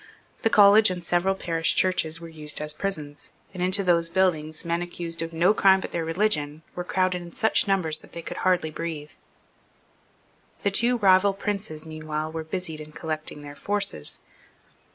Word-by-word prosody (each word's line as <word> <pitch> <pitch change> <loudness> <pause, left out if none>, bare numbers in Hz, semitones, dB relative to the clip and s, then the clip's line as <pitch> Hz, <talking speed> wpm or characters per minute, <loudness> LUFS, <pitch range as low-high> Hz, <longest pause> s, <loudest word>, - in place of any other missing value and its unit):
The 225 - +2
College 210 0 +7
and 180 -1 -4
several 175 +3 +1
parish 165 -3 0
churches 165 -3 +1
were 165 - -9
used 155 -2 -4
as 150 0 -2
prisons; 150 -5 -5 0.2
and 185 - -6
into 185 +2 +1
those 170 -2 +2
buildings 165 -4 0
men 170 +1 0
accused 170 -1 -4
of 165 0 -4
no 170 +5 +3
crime 190 -2 +5
but - - -6
their 170 - -2
religion 160 -4 -1
were 180 - -4
crowded 185 0 0
in 170 0 -10
such 220 -2 +2
numbers 170 -6 +2
that - - -17
they 170 - -7
could - - -6
hardly 180 -4 +1
breathe, 155 -2 -5 1.5
The 200 - +2
two 240 +5 +3
rival 195 -1 +5
princes 195 -6 -4
meanwhile 155 0 -4
were 160 0 -4
busied 160 -1 -5
in 155 0 -11
collecting 155 -2 -4
their 145 0 -9
forces. 200 - -2
170 Hz, 175 wpm, -25 LUFS, 155-190 Hz, 1.5 s, College